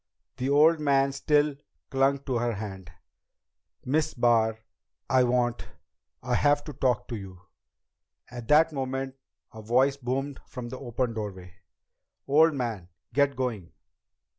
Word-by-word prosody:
The 130 +2 -2
old 155 +3 +5
man 140 -2 +2
still 145 +1 +2 0.4
clung 135 0 +2
to 130 -4 -1
her 120 0 0
hand. 95 -4 -7 0.9
"Miss 150 +4 0
Barr 115 -2 +3 0.5
I 130 -1 +4
want 120 -1 0 0.6
I - - -2
have 145 0 +3
to 150 - -8
talk 125 -6 0
to 120 - -3
you 95 -3 -9 0.4
" - - -34
At 120 -2 -8
that 155 +2 +5
moment 135 -1 -3 0.4
a 110 - -9
voice 130 +5 +2
boomed 135 +2 -3
from 120 -1 -7
the 130 - -7
open 120 -2 -2
doorway. 95 -5 -6 0.7
"Old 155 +3 +5
man! 115 -9 -4 0.2
Get 140 -1 +2
going!" 115 -9 -4
130 Hz, 140 wpm, -27 LUFS, 115-140 Hz, 0.9 s, old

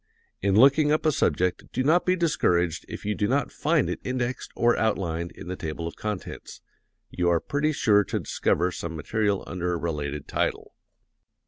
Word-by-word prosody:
In 95 0 +2
looking 140 +6 +6
up 155 +1 +1
a 155 - +5
subject 90 - 0
do 130 - -1
not 165 +7 +3
be 185 - +4
discouraged 90 - +1
if - - -7
you 105 - 0
do 105 0 0
not 140 +5 0
find 155 -2 +1
it - - -3
indexed 125 0 -3
or 120 0 +3
outlined 85 -6 -1
in - - -11
the 90 - -3
table 80 -1 -5
of 85 - -7
contents 105 -3 -6 0.5
you 90 -1 +1
are 85 -1 +3
pretty 145 - 0
sure 105 -8 +3
to - - -2
discover 90 +3 0
some 85 -1 -5
material 100 +5 -1
under 90 0 -2
a - - -1
related 75 -4 -4
title. - - -2
100 Hz, 185 wpm, -26 LUFS, 85-135 Hz, 0.5 s, looking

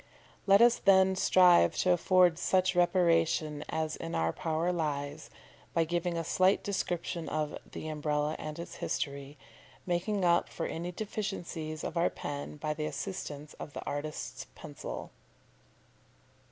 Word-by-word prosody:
Let 200 +3 +7
us 240 0 +5
then 190 -1 +5
strive 180 -2 +5
to 185 - +3
afford 180 -1 +4
such 185 0 +2
reparation 165 -4 +2
as 155 -1 -2
in 165 - -5
our 80 0 +1
power 165 +2 -1
lies, 150 -2 -3 0.5
by 165 - +4
giving 170 +1 -1
a 165 - -1
slight 185 +4 +2
description 175 -4 -2
of 150 -1 -2 0.2
THE - - -6
UMBRELLA 150 0 -1
AND 155 0 -6
ITS 170 - -7
HISTORY, 140 0 -4 0.5
making 185 +2 0
up 170 0 +3
for 165 - -4
any 170 +2 -4
deficiencies 175 -6 -4
of - - -4
our 170 - +3
pen 145 +1 -6
by 150 0 -2
the 150 0 -3
assistance 150 -6 -6
of 145 - -8
the - - -7
artist's 145 +1 -5
pencil. - - -7
165 Hz, 140 wpm, -31 LUFS, 150-180 Hz, 0.5 s, Let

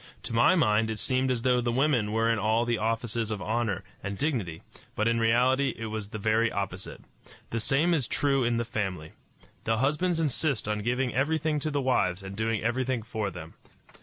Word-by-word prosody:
To - - -5
my 120 +10 +5
mind 110 -8 +3
it 110 - -3
seemed 130 +3 0
as 120 -3 -1
though 125 -1 +3
the 120 0 0
women 125 -5 +2
were 115 +1 +1
in 115 -1 +2
all 110 +3 +2
the 120 -1 0
offices 115 0 -1
of 105 -2 -3
honor 105 -1 -1 0.2
and 100 -1 -4
dignity, 110 - -2 0.3
but 110 - +1
in 115 0 +2
reality 125 +4 +3
it 115 - -5
was 110 -2 -5
the 110 - -5
very 110 +2 +2
opposite. 95 -2 -5 0.5
The 115 - -1
same 145 +9 +2
is 145 -7 0
true 135 -2 +1
in 120 0 +1
the 115 - -1
family. 95 -8 -3 0.5
The 115 0 +1
husbands 155 +7 +1
insist 145 -5 0
on 105 0 -1
giving 125 +3 -1
everything 155 +2 +1
to 155 - -2
the 145 -1 -1
wives 100 -8 +1
and 95 0 -7
doing 110 0 -1
everything 125 0 0
for 110 -2 -3
them. 85 -3 -9
115 Hz, 200 wpm, -28 LUFS, 105-130 Hz, 0.5 s, my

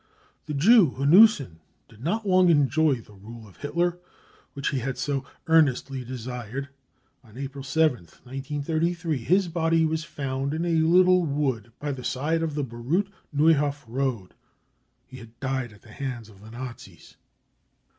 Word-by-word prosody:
The 150 - -3
Jew 180 - +5
Hanussen 145 - +5 0.3
did 115 +2 -16
not 210 +8 -1
long 185 -1 +5
enjoy 145 -1 +3
the 110 -3 -13
rule 110 +3 -12
of 95 - -19
Hitler 170 +4 -1 0.5
which 140 0 -2
he 135 - -1
had 130 +1 -4
so 140 -2 -2 0.2
earnestly 140 -4 +2
desired. 125 +1 -6 0.5
On 115 -1 -17
April 135 0 -6
7th, 135 - 0
1933, 155 +4 -2
his 185 +10 +2
body 165 -1 +1
was 160 0 -1
found 140 -2 -3
in 165 +2 -2
a 170 - 0
little 180 +3 +5
wood 135 -7 -2
by 145 0 -3
the 130 -2 -6
side 155 +7 -1
of 160 -3 -2
the 145 - -1
Baruth 135 - -2 0.2
Neuhof 145 -2 +2
road. 120 -5 -3 0.7
He 130 - -12
had 115 -1 -14
died 130 -3 -2
at 105 -1 -19
the 110 - -16
hands 125 -5 -5
of 100 -2 -18
the 110 - -13
Nazis. 120 +1 -10
140 Hz, 155 wpm, -25 LUFS, 125-160 Hz, 0.7 s, Jew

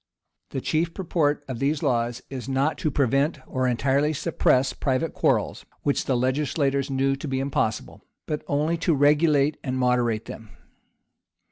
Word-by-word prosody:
The 135 - -4
chief 165 +4 -1
purport 155 -6 0
of 130 -3 -5
these 145 +2 0
laws 120 -4 0
is 135 -1 -7
not 135 +4 0
to 160 - 0
prevent 140 +3 +1
or 130 0 -1
entirely 140 +5 +1
suppress 135 -4 +1
private 140 +4 -1
quarrels, - - 0 0.2
which 140 - 0
the 130 - +1
legislators 140 +1 0
knew 135 0 +1
to 135 +3 -7
be 130 -1 -1
impossible, 135 -5 -2 0.2
but 150 - -3
only 150 +4 0
to 165 -1 +1
regulate 145 0 +3
and 130 -2 -2
moderate 125 -3 +1
them. 110 -2 -9
140 Hz, 150 wpm, -25 LUFS, 130-150 Hz, 0.2 s, regulate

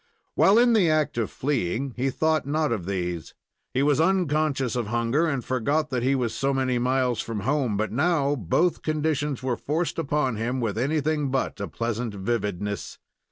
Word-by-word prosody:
While 200 +3 +5
in 240 0 +5
the 195 -7 +4
act 155 -5 +1
of 110 - -1
fleeing, 130 -1 -2
he 130 +2 0
thought 155 0 0
not 155 0 0
of 100 -7 -2
these. 90 -4 -3 0.4
He 135 - +1
was 145 +1 +3
unconscious 155 - +1
of 120 -4 -1
hunger, 120 +8 +1
and 140 -5 -2
forgot 140 +5 0
that 125 -2 0
he 135 +3 +2
was 120 -4 -1
so 135 0 0
many 130 -2 +1
miles 125 -2 +1
from 110 -3 -4
home; 130 -3 0
but 110 +1 -1
now 145 +1 +2
both 150 - +1
conditions 150 -3 -1
were 130 -2 0
forced 165 +3 -2
upon 140 -6 0
him 120 +4 -2
with 115 -4 -1
anything 150 +3 0
but 130 0 -1
a - - -3
pleasant 115 -1 -3
vividness. 100 -1 -3
130 Hz, 180 wpm, -25 LUFS, 115-150 Hz, 0.4 s, While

